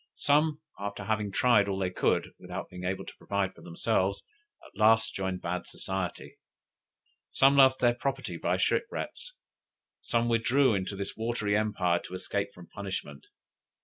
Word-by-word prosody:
Some, 150 Hz, +1 st, +2 dB, 0.2 s
after 100 Hz, 0 st, -4 dB
having 105 Hz, 0 st, -1 dB
tried 105 Hz, -2 st, +4 dB
all 95 Hz, -, -1 dB
they 95 Hz, -2 st, -1 dB
could, -, -, +1 dB
without -, -, -7 dB
being 90 Hz, 0 st, -7 dB
able 95 Hz, +1 st, -2 dB
to -, -, -10 dB
provide 100 Hz, -2 st, -1 dB
for -, -, -16 dB
themselves, 95 Hz, +2 st, 0 dB, 0.4 s
at -, -, -17 dB
last 110 Hz, +1 st, +4 dB
joined 95 Hz, -1 st, -3 dB
bad 90 Hz, +1 st, -3 dB
society. 95 Hz, -2 st, -5 dB, 0.9 s
Some 135 Hz, +1 st, +5 dB
lost 130 Hz, -1 st, +7 dB
their 120 Hz, -1 st, +5 dB
property 135 Hz, +2 st, -3 dB
by -, -, 0 dB
shipwrecks; 485 Hz, +2 st, -2 dB, 0.7 s
some 115 Hz, 0 st, +1 dB
withdrew 120 Hz, +3 st, +3 dB
into 95 Hz, 0 st, -2 dB
this 100 Hz, 0 st, -5 dB
watery 110 Hz, -2 st, -1 dB
empire 95 Hz, -5 st, +1 dB
to 90 Hz, -, -8 dB
escape 100 Hz, +2 st, -2 dB
from 90 Hz, -2 st, -13 dB
punishment. 95 Hz, -9 st, -6 dB
100 Hz, 150 wpm, -29 LUFS, 95-120 Hz, 0.9 s, lost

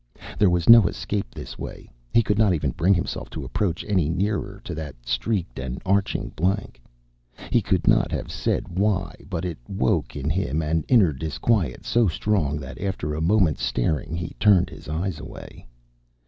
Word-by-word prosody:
There 100 Hz, -, +5 dB
was 90 Hz, -1 st, 0 dB
no 115 Hz, -5 st, +9 dB
escape 100 Hz, -3 st, -3 dB
this -, -, -8 dB
way. -, -, -7 dB, 0.2 s
He 115 Hz, -, +4 dB
could 105 Hz, 0 st, 0 dB
not 105 Hz, -5 st, +4 dB
even 75 Hz, -4 st, -1 dB
bring 95 Hz, +8 st, +3 dB
himself 85 Hz, -, -3 dB
to -, -, -6 dB
approach 100 Hz, -5 st, -2 dB
any 90 Hz, -8 st, +2 dB
nearer 100 Hz, +3 st, -1 dB
to 100 Hz, -7 st, -5 dB
that 75 Hz, -3 st, -6 dB
streaked 90 Hz, -, -1 dB
and 65 Hz, -1 st, -4 dB
arching 100 Hz, +1 st, +1 dB
blank. 95 Hz, -5 st, -2 dB, 0.7 s
He -, -, +4 dB
could -, -, 0 dB
not -, -, +4 dB
have -, -, -3 dB
said -, -, -1 dB
why, 95 Hz, 0 st, 0 dB
but 90 Hz, -2 st, -3 dB
it 85 Hz, -6 st, -4 dB
woke 95 Hz, -9 st, 0 dB
in 70 Hz, 0 st, -4 dB
him 80 Hz, -2 st, 0 dB
an 80 Hz, +1 st, 0 dB
inner 105 Hz, -, +5 dB
disquiet 80 Hz, -, -1 dB
so 120 Hz, -2 st, +3 dB
strong 80 Hz, -4 st, 0 dB
that 65 Hz, -1 st, -9 dB
after 95 Hz, -7 st, -2 dB
a 75 Hz, -, -3 dB
moment's 85 Hz, -3 st, +2 dB
staring 80 Hz, +6 st, -1 dB
he 85 Hz, 0 st, -4 dB
turned 100 Hz, -4 st, +4 dB
his -, -, -11 dB
eyes 80 Hz, +2 st, -2 dB
away. -, -, -11 dB
90 Hz, 175 wpm, -24 LUFS, 75-100 Hz, 0.7 s, no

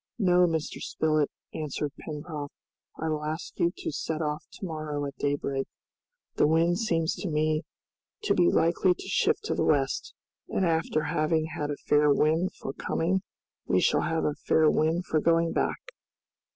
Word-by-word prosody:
"No, 180 Hz, -4 st, +4 dB
Mr. 160 Hz, -2 st, -2 dB
Spilett," 155 Hz, -2 st, +1 dB, 0.2 s
answered 150 Hz, -1 st, -3 dB
Pencroft, 150 Hz, -1 st, -6 dB, 0.5 s
"I 160 Hz, -, -2 dB
will 155 Hz, -1 st, -1 dB
ask 155 Hz, +3 st, -5 dB
you 170 Hz, -, +3 dB
to -, -, -4 dB
set 155 Hz, +1 st, -3 dB
off 150 Hz, -1 st, -2 dB
to -, -, -7 dB
morrow 155 Hz, -3 st, -3 dB
at 140 Hz, -, -6 dB
daybreak. 140 Hz, -1 st, -1 dB, 0.7 s
The -, -, +5 dB
wind 165 Hz, +3 st, +3 dB
seems 165 Hz, -8 st, +1 dB
to 195 Hz, -, -3 dB
me 155 Hz, 0 st, +1 dB, 0.6 s
to -, -, +2 dB
be 175 Hz, -1 st, +4 dB
likely 175 Hz, +2 st, +3 dB
to -, -, -9 dB
shift -, -, +1 dB
to -, -, -1 dB
the -, -, 0 dB
west, 135 Hz, -3 st, +1 dB, 0.3 s
and 190 Hz, -, +1 dB
after 160 Hz, -2 st, +1 dB
having 155 Hz, +1 st, +1 dB
had 150 Hz, -1 st, -2 dB
a 145 Hz, -, -3 dB
fair 150 Hz, 0 st, +3 dB
wind 160 Hz, +5 st, +2 dB
for 135 Hz, -, -6 dB
coming 185 Hz, +6 st, 0 dB, 0.5 s
we -, -, +3 dB
shall -, -, +3 dB
have 165 Hz, -1 st, 0 dB
a 150 Hz, -, +1 dB
fair 155 Hz, +1 st, +3 dB
wind 165 Hz, +3 st, +1 dB
for 155 Hz, -, +1 dB
going 165 Hz, +1 st, +2 dB
back." -, -, 0 dB
155 Hz, 170 wpm, -28 LUFS, 150-165 Hz, 0.7 s, The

